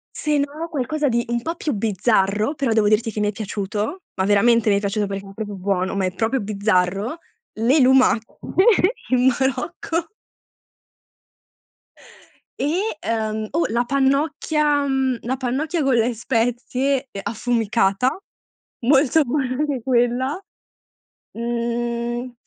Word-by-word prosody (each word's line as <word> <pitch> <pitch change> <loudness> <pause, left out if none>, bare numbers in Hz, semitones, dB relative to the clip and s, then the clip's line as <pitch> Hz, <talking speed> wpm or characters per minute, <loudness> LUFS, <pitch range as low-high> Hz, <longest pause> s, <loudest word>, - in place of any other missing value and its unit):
Se 300 -1 0
no, 290 +4 -2
qualcosa 295 0 -1
di 235 0 0
un 235 0 0
po' 330 +6 -3
più 305 -4 -2
bizzarro, 210 - +1
però 275 -6 -1
devo 220 -2 +3
dirti 220 +1 +2
che 210 - -5
mi 205 0 +1
è - - -1
piaciuto, 210 - -4
ma 190 - -1
veramente 220 +2 +4
mi 200 - +4
è - - +2
piaciuto, 205 0 -1
perché 195 0 -5
era 195 0 -12
proprio 210 -1 -5
buono, 190 0 -1
ma 195 -1 0
è 185 - -2
proprio 225 +6 0
bizzarro, 200 - 0 0.4
le 245 +7 +2
lumache 255 -3 +3 0.7
in 255 0 +3
Marocco. 325 - -2 2.5
E, - - 0 0.4
ehm, 220 -1 -2
o 335 - +2
la 235 +2 +1
pannocchia 285 +2 +1
mhmm, 265 -2 0
la 260 +2 -1
pannocchia 290 +6 -1
con 270 -2 +2
le 235 +1 +2
spezie, 250 +4 -1
ehm, 195 - -6
affumicata, 230 +1 +1 0.7
molto 285 +2 +4
buona 255 -1 -1
anche 285 -5 -1
quella. 255 +7 +1 0.9
Mhmm, 235 +1 -3
240 Hz, 135 wpm, -21 LUFS, 215-270 Hz, 2.5 s, veramente